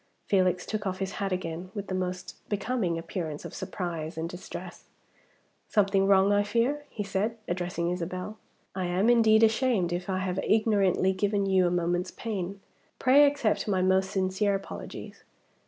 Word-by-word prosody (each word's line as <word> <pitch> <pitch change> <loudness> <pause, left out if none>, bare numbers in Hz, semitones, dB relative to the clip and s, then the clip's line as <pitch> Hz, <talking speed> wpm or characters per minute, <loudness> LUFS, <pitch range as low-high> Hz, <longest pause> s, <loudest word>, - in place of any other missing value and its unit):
Felix 185 -2 +2
took 210 -2 -3
off 185 0 -2
his 195 0 -3
hat 195 -1 -1
again 175 0 -4
with 205 -1 -4
the 190 - -5
most 185 0 -3
becoming 205 -4 -1
appearance 165 -2 -5
of - - -7
surprise 165 -3 -4
and 160 +1 -2
distress. 180 +2 -8 0.8
"Something 195 -2 +2
wrong, 195 0 +5
I 205 - +4
fear?" 235 +8 0
he 210 - -4
said, 200 +4 -1
addressing 175 -1 -2
Isabel. 180 +4 -4 0.3
"I 185 -1 -2
am, 190 +6 +3
indeed, 225 -2 +5
ashamed 220 -6 +2
if 180 +2 -4
I 190 - 0
have 185 0 -2
ignorantly 200 -4 +2
given 200 +1 0
you 190 -2 +3
a - - +2
moment's 175 +1 0
pain. 195 -3 -5 0.4
Pray 280 +3 +6
accept 280 -8 0
my 190 -3 +1
most 190 0 +3
sincere 190 +2 +1
apologies. 195 - -8
190 Hz, 160 wpm, -28 LUFS, 180-210 Hz, 0.8 s, Pray